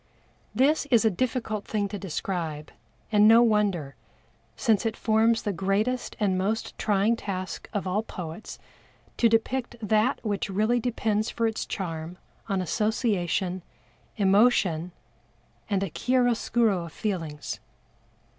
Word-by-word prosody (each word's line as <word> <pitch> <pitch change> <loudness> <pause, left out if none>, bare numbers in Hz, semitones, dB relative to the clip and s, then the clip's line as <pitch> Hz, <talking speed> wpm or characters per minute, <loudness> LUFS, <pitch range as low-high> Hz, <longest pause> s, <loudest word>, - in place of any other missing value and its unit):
This 285 +5 +3
is 235 -5 +4
a 220 - +4
difficult 225 -1 -2
thing 205 -2 -1
to 205 0 -5
describe, 165 -4 -4 0.4
and 210 0 +6
no 230 +2 +8
wonder, 200 -10 +1 0.6
since 225 -5 +2
it 225 -1 -2
forms 225 +1 +2
the 205 - -1
greatest 200 +8 -1
and 190 -3 +1
most 215 +4 -2
trying 210 +2 +2
task 185 -4 -5
of 205 -3 -2
all 190 +3 0
poets 180 -2 -8 0.6
to 230 - +4
depict 240 +2 0
that 220 +4 +1
which 205 +1 -1
really 215 +5 +2
depends 220 -2 0
for 230 - -1
its 220 -1 -2
charm 165 -2 -5 0.3
on 195 -2 0
association, 190 -3 0 0.6
emotion 195 -5 +3 0.8
and 200 -2 +1
a 195 - -2
chiaroscuro 240 -3 +2
of 165 - -10
the - - -19
feelings. 165 -8 -3
210 Hz, 130 wpm, -26 LUFS, 185-225 Hz, 0.8 s, no